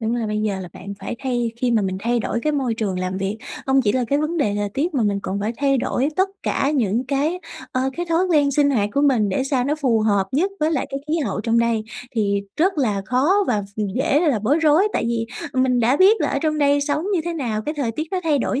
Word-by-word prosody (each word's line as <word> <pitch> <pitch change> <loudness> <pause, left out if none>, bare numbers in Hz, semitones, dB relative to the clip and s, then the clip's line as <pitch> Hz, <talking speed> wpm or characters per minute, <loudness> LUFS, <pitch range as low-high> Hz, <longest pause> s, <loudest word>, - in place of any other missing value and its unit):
đúng 225 +1 -1
là 235 -2 -1
bây 210 0 -2
giờ 205 -3 -1
là 180 - -7
bạn 200 +2 -8
phải 215 - -5
thay 245 -3 -1
khi 245 0 0
mà 225 -3 +2
mình 190 -1 -2
thay 235 +2 +1
đổi 235 - -2
cái 305 - +1
môi 260 -6 0
trường 200 -5 -2
làm 185 +1 -2
việc, 195 +3 -3 0.3
hông 270 0 +3
chỉ 205 -4 +2
là 255 +1 +1
cái 285 - +2
vấn 310 +3 -1
đề 210 -10 +1
thời 205 0 -1
tiết 300 - -2
mà 260 - +2
mình 205 -2 +1
còn 195 +1 -3
phải 215 +3 -1
thay 275 -1 +2
đổi 255 +3 0
tất 380 +1 +3
cả 275 - 0
những 230 -1 +1
cái, 290 +6 0 0.3
ờ, 255 - 0 0.2
cái 350 0 -3
thói 335 +3 +2
quen 295 -5 +3
sinh 285 +1 +3
hoạt 210 -7 +1
của 280 - +2
mình 250 -8 +3
để 200 +8 0
sao 270 -2 0
nó 290 +3 +1
phù 255 -7 +1
hợp 200 -3 +2
nhất 340 +9 +1
với 310 +2 +2
lại - - -1
cái 275 - -3
khí 325 +2 +1
hậu 210 -9 -2
trong 230 +2 +1
đây 230 -2 +1 0.3
thì 200 -3 +1
rất 360 +1 +1
là 210 -8 0
khó 255 +8 +2 0.2
và 210 -4 +1
ph - - -15 0.2
dễ 275 +2 +2
là 300 -9 +2
bối 245 +9 +2
rối. 325 +5 +4
Tại - - 0
vì 230 -1 -1 0.3
mình 255 -1 +2
đã 245 +5 +3
biết 400 +6 +5
là - - +1
ở - - 0
trong 305 -1 0
đây 285 0 +3
sống 290 +2 -1
như 350 - +2
thế 345 - -2
nào, 230 -8 -2
cái 300 +5 -3
thời 260 -6 -2
tiết 305 - -3
nó 375 - -1
thay 310 -4 +2
đổi 260 +1 -1
255 Hz, 275 wpm, -21 LUFS, 215-295 Hz, 0.3 s, biết